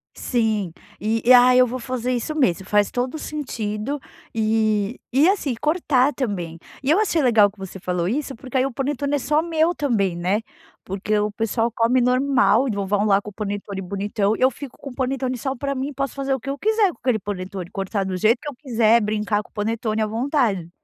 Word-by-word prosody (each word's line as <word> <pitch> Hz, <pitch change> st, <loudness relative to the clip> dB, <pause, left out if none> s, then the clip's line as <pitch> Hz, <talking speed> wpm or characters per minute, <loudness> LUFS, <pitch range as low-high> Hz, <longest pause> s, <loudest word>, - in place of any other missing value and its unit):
Sim. 220 Hz, -7 st, 0 dB, 0.3 s
E 225 Hz, +2 st, 0 dB
e, 255 Hz, -, +8 dB
ah, 250 Hz, 0 st, +7 dB
eu 250 Hz, 0 st, +6 dB
vou 255 Hz, +2 st, -4 dB
fazer 255 Hz, 0 st, -3 dB
isso 245 Hz, +5 st, -2 dB
mesmo, 195 Hz, -, +1 dB
faz 205 Hz, -1 st, +3 dB
todo 250 Hz, +3 st, -2 dB
o -, -, -5 dB
sentido, 255 Hz, -3 st, -4 dB, 0.3 s
e 215 Hz, 0 st, +1 dB
e, 280 Hz, +5 st, +5 dB
assim, 360 Hz, -10 st, 0 dB
cortar 295 Hz, -4 st, +2 dB
também. 180 Hz, -10 st, -3 dB, 0.2 s
E 270 Hz, -, +2 dB
eu 360 Hz, -, +4 dB
achei 355 Hz, -7 st, +2 dB
legal 225 Hz, -6 st, +5 dB
que 210 Hz, -, -29 dB
você 190 Hz, 0 st, -8 dB
falou 180 Hz, -1 st, -1 dB
isso 270 Hz, +6 st, -2 dB
porque 255 Hz, +3 st, -4 dB
aí 260 Hz, -, +3 dB
o 275 Hz, -, -2 dB
panetone 285 Hz, +1 st, -1 dB
é -, -, 0 dB
só 300 Hz, +4 st, +1 dB
meu 330 Hz, +1 st, +1 dB
também, 215 Hz, -, 0 dB
né. 185 Hz, +5 st, 0 dB, 0.4 s
Porque 200 Hz, +2 st, -1 dB
o 210 Hz, 0 st, 0 dB
pessoal 225 Hz, +2 st, 0 dB
come 235 Hz, +3 st, +3 dB
normal 250 Hz, -2 st, +3 dB
e -, -, 0 dB
vão 200 Hz, -1 st, -2 dB
vão 205 Hz, +1 st, +1 dB
lá 200 Hz, -1 st, +4 dB
com 210 Hz, -, -8 dB
o -, -, -15 dB
panetone 200 Hz, -1 st, -4 dB
bonitão 200 Hz, +2 st, -1 dB
e -, -, -9 dB
eu 260 Hz, -, +6 dB
fico 270 Hz, +1 st, -10 dB
com 280 Hz, -, -8 dB
o -, -, -13 dB
panetone 260 Hz, -1 st, -1 dB
só 265 Hz, +2 st, -3 dB
para 275 Hz, +2 st, -3 dB
mim, 270 Hz, +2 st, -3 dB
posso 275 Hz, -1 st, -3 dB
fazer 275 Hz, -1 st, -1 dB
o 265 Hz, -, -1 dB
que 275 Hz, -, -7 dB
eu 275 Hz, -, -2 dB
quiser 430 Hz, +1 st, +2 dB
com -, -, -23 dB
aquele 250 Hz, -4 st, +1 dB
panetone 190 Hz, -2 st, -5 dB
e -, -, -24 dB
cortar 195 Hz, 0 st, -2 dB
do 190 Hz, -, -3 dB
jeito 225 Hz, +6 st, +3 dB
que 295 Hz, -, -5 dB
eu 275 Hz, -, -9 dB
quiser, 235 Hz, -4 st, +3 dB
brincar 210 Hz, 0 st, 0 dB
com -, -, -20 dB
o -, -, -44 dB
panetone 220 Hz, +1 st, -1 dB
à 215 Hz, -, +1 dB
vontade. 225 Hz, -, 0 dB
230 Hz, 230 wpm, -22 LUFS, 205-270 Hz, 0.4 s, e